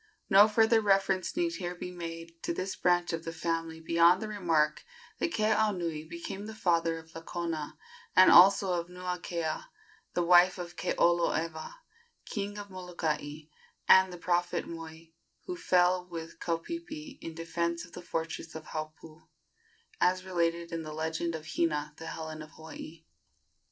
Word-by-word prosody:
No 200 +2 +9
further 225 +1 +4
reference 195 - +2
need 340 -1 +1
here 180 -2 -4
be 180 0 -6
made 165 -1 -8
to 170 - -2
this 190 +2 -3
branch 175 -1 +2
of 165 0 -3
the 165 - -4
family 165 0 -3
beyond 170 +2 +4
the 220 - -4
remark 165 -7 +1 0.4
that 335 - 0
Keaunui 200 - 0
became 195 +4 -6
the 220 - -8
father 165 -4 +1
of 160 0 -13
Lakona, 165 -2 -4 0.4
and 185 - +8
also 195 +1 +7
of 170 -1 -2
Nuakea, 180 - -3 0.5
the 175 - +2
wife 175 +2 +6
of 175 -1 -7
Keoloewa, 165 - 0 0.5
King 205 -1 -4
of 205 -1 -8
Molokai, 160 -5 -3 0.5
and 190 0 +8
of - - -11
the - - -7
prophet 175 +1 0
Moi, 165 0 -9 0.3
who 360 - -4
fell 180 - +2
with 165 -2 -8
Kaupeepee 305 - -5
in 165 - -7
defence 170 +1 -2
of 175 - -18
the - - -7
fortress 160 -2 -4
of 160 -1 -7
Haupu, 155 0 -8 0.7
as 185 +1 +2
related 170 -2 -1
in 165 -1 -3
the 155 -1 -7
legend 160 +2 -2
of 155 -1 -7
"Hina, 150 -2 -1
the 160 - -8
Helen 160 -1 -6
of 155 - -10
Hawaii." 160 0 -10
170 Hz, 155 wpm, -30 LUFS, 165-185 Hz, 0.7 s, No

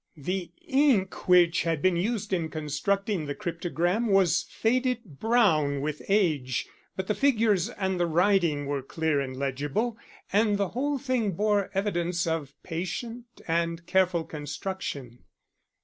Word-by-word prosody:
The 180 +5 -3 0.2
ink 265 - +2
which 180 -1 +5
had 165 -2 0
been 185 +3 +2
used 205 +2 -1
in 165 -3 0
constructing 155 +4 -1
the 145 - -3
cryptogram 175 +3 -1
was 190 -3 +3
faded 250 +1 0 0.2
brown 175 - +3
with 150 +1 -3
age, 155 - +1 0.3
but 190 - -3
the 210 - 0
figures 220 -6 +2
and 190 -2 -2
the 175 - +2
writing 170 -4 +2
were 140 -1 -2
clear 155 +2 -1
and 130 -2 -4
legible, 145 - -2 0.3
and 210 0 +3
the 200 -2 0
whole 280 +4 -1
thing 250 -7 0
bore 205 +1 +1
evidence 175 -3 0
of 160 -4 -3
patient 225 +8 -5 0.2
and 170 0 -1
careful 185 -3 +2
construction. 150 -5 -5
180 Hz, 135 wpm, -27 LUFS, 160-210 Hz, 0.3 s, which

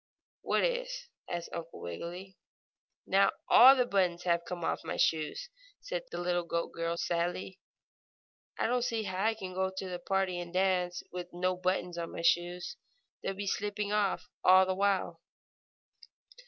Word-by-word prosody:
"What - - +1
is?" - - -2 0.2
asked 175 -1 -4
Uncle 170 0 -6
Wiggily. 175 - -7 0.7
"Now - - +4 0.2
all 265 +3 +9
the 250 -2 +2
buttons 180 -5 +1
have 170 -1 +1
come 175 -2 -5
off - - -1
my - - -4
shoes!" 160 - 0 0.3
said - - -4
the - - -6
little 175 0 0
goat 170 0 -2
girl, 165 0 -2
sadly. 175 +2 -2 1.0
"I - - 0
don't 245 +2 +1
see 230 -2 -1
how 190 -1 -2
I 225 +1 +2
can 190 -4 -7
go 190 +1 0
on 190 0 -5
to 190 0 -4
the 180 -1 -4
party 190 0 0
and 175 -1 -6
dance, 180 -1 +1
with 180 0 -5
no 180 +1 0
buttons 180 -1 -1
on 170 - -5
my 170 - -5
shoes. 175 +9 +1 0.4
They'll 195 - -3
be 200 +1 -4
slipping 205 +1 -2
off 210 -2 0 0.2
all 185 +1 +7
the 185 - 0
while." 190 -3 0
185 Hz, 170 wpm, -31 LUFS, 175-200 Hz, 1.0 s, all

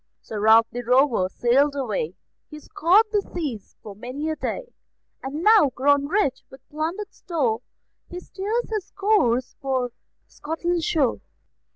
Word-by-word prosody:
Sir 215 - -7
Ralph 220 +2 +6
the 245 - -4
Rover 245 -5 +3
sailed 275 +7 +2
away; 210 - -2 0.3
He 300 - -9
scoured 360 +8 +3
the 415 - +2
seas 290 - -6
for 205 -2 -9
many 255 +8 -4
a - - -2
day; - - -5 0.5
And 285 +5 -5
now, 425 -9 +6
grown 285 +2 +2
rich 345 -6 0
with 265 - -16
plundered 335 +7 -4
store, 260 - -1 0.5
He 355 - -6
steers 420 +7 -3
his 425 -4 -3
course 325 - +1
for 260 -3 -1 0.4
Scotland's 330 +2 -3
shore. 285 -7 +1
285 Hz, 145 wpm, -23 LUFS, 245-355 Hz, 0.5 s, Ralph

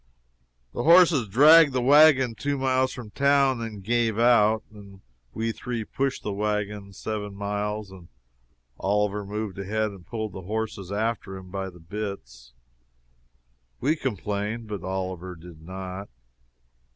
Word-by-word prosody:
The - - -3
horses 165 -7 +6
dragged 150 +7 +7
the 130 - +1
wagon 140 -3 +6
two 140 +7 -2
miles 130 -1 +1
from 120 -5 -9
town 140 -2 +3
and 115 -1 -5
then 100 - -10
gave 115 +1 0
out. 110 -2 +4
Then 100 -2 -14 0.3
we 115 - -2
three 120 0 -4
pushed 135 +4 -2
the 105 - -3
wagon 105 -1 -2
seven 105 0 -5
miles, 105 0 -3
and 90 -3 -13 0.7
Oliver 105 +1 0
moved 105 -1 -5
ahead 110 +2 -1
and 95 -3 -13
pulled 110 0 -5
the 95 - -7
horses 100 -1 -4
after 105 -2 -2
him 95 -1 -12
by 95 0 -4
the 90 -1 -15
bits. 80 - -7 1.3
We 150 +5 +1
complained, 105 - -3
but 105 -4 -6
Oliver 95 -1 -4
did 80 -1 -13
not. 95 +3 -7
105 Hz, 140 wpm, -25 LUFS, 95-120 Hz, 1.3 s, dragged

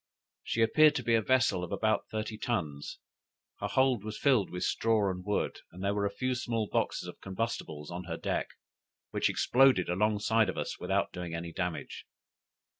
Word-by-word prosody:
She 115 - +1
appeared 150 +6 +5
to 125 - -1
be 115 - +1
a 115 - +4
vessel 115 -6 +2
of 90 - -6
about 110 0 +1
thirty 110 0 -3
tons; 80 -12 -3 0.6
her - - -2
hold 130 -5 +2
was 110 0 -5
filled 130 -9 +3
with 90 - -4
straw 110 -3 +2
and 90 0 -6
wood, 105 +2 -1
and 90 +3 -9
there 100 +1 +1
were 100 0 +1
a - - -2
few 130 +6 -2
small 115 -3 -1
boxes - - -1
of - - -10
combustibles 95 -7 -4
on 90 +1 -5
her 85 -2 -4
deck, - - -1 0.6
which - - +1
exploded 130 -9 +4
alongside 105 +4 +2
of - - -4
us - - -3
without - - 0
doing 90 -2 -5
any 85 0 -5
damage. 90 -2 -4
105 Hz, 185 wpm, -30 LUFS, 90-115 Hz, 0.6 s, appeared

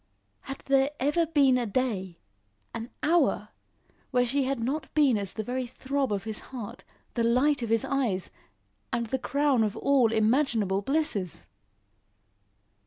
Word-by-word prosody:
Had 270 0 -8
there 275 0 +3
ever 295 +5 +2
been 275 -5 +4
a 240 - -2
day 200 -6 -2 0.6
an 230 +1 -5
hour 335 +2 +2 0.6
when 250 -1 +2
she 270 +2 0
had 270 -1 -1
not 265 +5 -3
been 285 -5 +4
as 200 -3 -3
the 220 - -4
very 250 +2 -3
throb 265 +1 -2
of 200 -2 -1
his 220 -1 -3
heart, 240 -6 -7 0.3
the 235 - 0
light 255 +5 +3
of 230 - -3
his 225 -1 +2
eyes, 240 -10 -1 0.6
and 235 0 0
the 265 +4 -2
crown 280 -3 +2
of 210 -2 -2
all 265 -5 +3
imaginable 220 -3 +2
blisses? 205 - -1
250 Hz, 150 wpm, -28 LUFS, 220-275 Hz, 0.6 s, been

